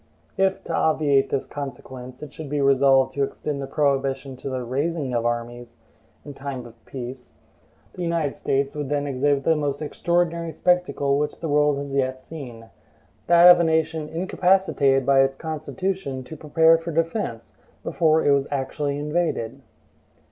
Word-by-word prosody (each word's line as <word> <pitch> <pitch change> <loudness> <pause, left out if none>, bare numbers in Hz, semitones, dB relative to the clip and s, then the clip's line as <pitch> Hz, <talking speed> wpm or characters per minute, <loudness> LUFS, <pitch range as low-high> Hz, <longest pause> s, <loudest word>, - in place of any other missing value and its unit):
If, 190 0 +1
to - - -5
obviate 145 -3 +2
this 135 - -1
consequence, 130 -2 -8
it 150 - -9
should 155 -3 -8
be 145 0 -1
resolved 135 -1 +4
to 140 - -2
extend 140 +1 -4
the 135 - -4
prohibition 135 -2 0
to 135 - -6
the 130 -1 -3
RAISING 140 +2 -2
of 120 0 +1
armies 120 0 -4 0.5
in 145 - -8
time 135 -2 -6
of 115 -1 -15
peace, 125 -1 -8 0.6
the - - -8
United 170 -4 -1
States 140 +1 -1
would 145 -3 -4
then 145 -1 0
exhibit 140 +1 +1
the 160 - +3
most 145 -2 -2
extraordinary 170 +1 -1
spectacle 180 -6 +1
which 150 0 -2
the 165 - -4
world 150 0 +3
has 140 -1 -5
yet 130 -1 0
seen, 125 -6 -10 0.6
that 170 +1 +7
of 175 - +6
a - - +3
nation 160 -1 0
incapacitated 175 -6 +2
by 135 0 +4
its 135 0 +1
Constitution 160 -1 -4
to 160 - -9
prepare 160 +2 +4
for 165 +1 -5
defense, 165 - -2 0.3
before 160 -1 +2
it 145 - +5
was 140 -1 +2
actually 140 +1 -2
invaded. 150 -6 -2
140 Hz, 160 wpm, -23 LUFS, 135-160 Hz, 0.6 s, that